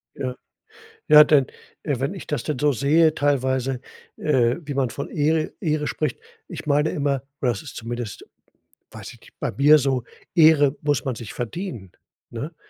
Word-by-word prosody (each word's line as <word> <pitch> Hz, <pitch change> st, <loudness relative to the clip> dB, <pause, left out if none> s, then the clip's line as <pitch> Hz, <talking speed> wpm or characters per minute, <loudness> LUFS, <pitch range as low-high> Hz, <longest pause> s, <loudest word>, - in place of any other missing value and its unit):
Ja, 130 Hz, -2 st, -4 dB, 0.7 s
ja, 150 Hz, 0 st, +9 dB
dann 145 Hz, -3 st, +4 dB, 0.4 s
wenn 140 Hz, +2 st, -2 dB
ich 190 Hz, -, -9 dB
das 145 Hz, -6 st, -2 dB
denn 150 Hz, -4 st, -3 dB
so 150 Hz, 0 st, +3 dB
sehe 155 Hz, +5 st, +3 dB
teilweise, 130 Hz, -2 st, 0 dB, 0.4 s
äh, 125 Hz, -5 st, +2 dB
wie 145 Hz, -2 st, -6 dB
man 135 Hz, -2 st, 0 dB
von 140 Hz, -, -6 dB
Ehre 155 Hz, +1 st, 0 dB
Ehre 155 Hz, -3 st, -1 dB
spricht 155 Hz, -5 st, -2 dB, 0.3 s
ich -, -, -8 dB
meine 150 Hz, +1 st, +2 dB
immer 140 Hz, -2 st, -1 dB, 0.2 s
oder 125 Hz, -, +2 dB
das 120 Hz, -, -5 dB
ist 145 Hz, -, -10 dB
zumindest, 120 Hz, -2 st, -6 dB, 0.7 s
weiß -, -, -9 dB
ich -, -, -18 dB
nicht, -, -, -19 dB
bei -, -, -2 dB
mir 145 Hz, +7 st, +6 dB
so, 130 Hz, -3 st, 0 dB, 0.3 s
Ehre 155 Hz, -4 st, +5 dB
muss 145 Hz, -2 st, 0 dB
man 130 Hz, -3 st, -2 dB
sich 110 Hz, -1 st, -8 dB
verdienen, 120 Hz, -, -6 dB, 0.4 s
ne? 115 Hz, -1 st, -7 dB
Ne? 160 Hz, +5 st, -6 dB
140 Hz, 175 wpm, -23 LUFS, 125-150 Hz, 0.7 s, ja